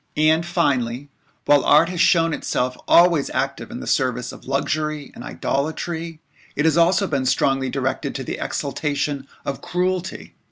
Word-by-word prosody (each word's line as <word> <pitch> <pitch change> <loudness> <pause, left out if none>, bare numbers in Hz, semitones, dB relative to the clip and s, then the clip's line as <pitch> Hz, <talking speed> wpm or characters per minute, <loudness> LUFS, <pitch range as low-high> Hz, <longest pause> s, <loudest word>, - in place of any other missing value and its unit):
And 155 +2 +3
finally, 140 -6 -1 0.4
while 145 -2 +5
art 160 +3 +5
has 180 -2 -5
thus - - +6
shown 165 -2 +3
itself 125 -3 -1
always 170 -4 +5
active 135 +1 -2
in 245 - -7
the - - -7
service 125 -2 0
of - - -13
luxury 150 +1 -2
and - - -10
idolatry, 160 +5 -3 0.4
it 150 - 0
has 160 -2 +3
also 180 +4 +4
been 140 -7 -1
strongly 135 0 +1
directed 130 0 -2
to - - -3
the - - -5
exaltation 145 -1 -2 0.2
of 140 - -4
cruelty. 180 0 -2
150 Hz, 160 wpm, -22 LUFS, 135-170 Hz, 0.4 s, thus